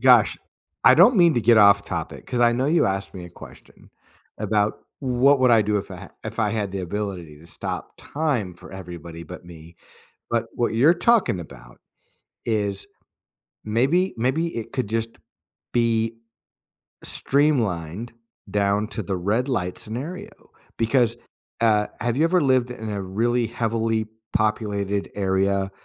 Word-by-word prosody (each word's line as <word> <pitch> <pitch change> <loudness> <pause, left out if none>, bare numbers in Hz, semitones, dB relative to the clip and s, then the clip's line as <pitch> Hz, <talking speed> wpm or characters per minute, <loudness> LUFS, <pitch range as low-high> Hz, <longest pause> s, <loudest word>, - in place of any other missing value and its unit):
gosh, - - +5 0.5
I - - +8
don't 245 -3 +6
mean 170 -3 +5
to 120 - +2
get 115 +1 +5
off 100 -1 +6
topic 85 -3 -5
'cause 125 -1 -2
I 120 0 +5
know 130 +3 0
you 165 +3 +3
asked 95 0 -3
me 90 -2 -7
a 85 - -11
question - - -15 0.5
about 105 0 0 0.2
what 135 +1 +3
would 130 - +5
I 115 -2 +6
do 105 0 0
if - - -7
I - - -8
h - - -19
if - - -6
I 105 -2 +2
had 105 -3 -2
the 95 - -3
ability 90 -5 -5
to 80 - -16
stop - - -6
time 135 - -2
for 85 - -14
everybody 85 -3 -8
but 90 +2 -10
me, 85 -1 -13 0.5
but 115 0 0
what 120 -2 -1
you're 145 +9 +5
talking 200 - +2
about - - -13 0.7
is 105 -3 -1 0.8
maybe 135 - +1
maybe 145 +8 -1
it 115 - -5
could 125 -6 -2
just 115 +1 -3 0.6
be 115 -1 +1 0.9
streamlined 115 - 0 0.4
down 100 +1 +1
to 110 - -4
the 95 0 -3
red 110 +9 0
light 90 -8 -2
scenario 170 - -7 0.3
because, 115 0 +2 0.4
uh, 105 -2 +3
have 120 +1 -1
you 155 - +3
ever 180 +1 +3
lived 130 -3 +2
in 110 -3 -6
a 100 -1 -3
really 115 +5 0
heavily 115 -1 -1 0.3
populated 100 -1 -1
area? 95 0 0
110 Hz, 155 wpm, -23 LUFS, 95-125 Hz, 0.9 s, I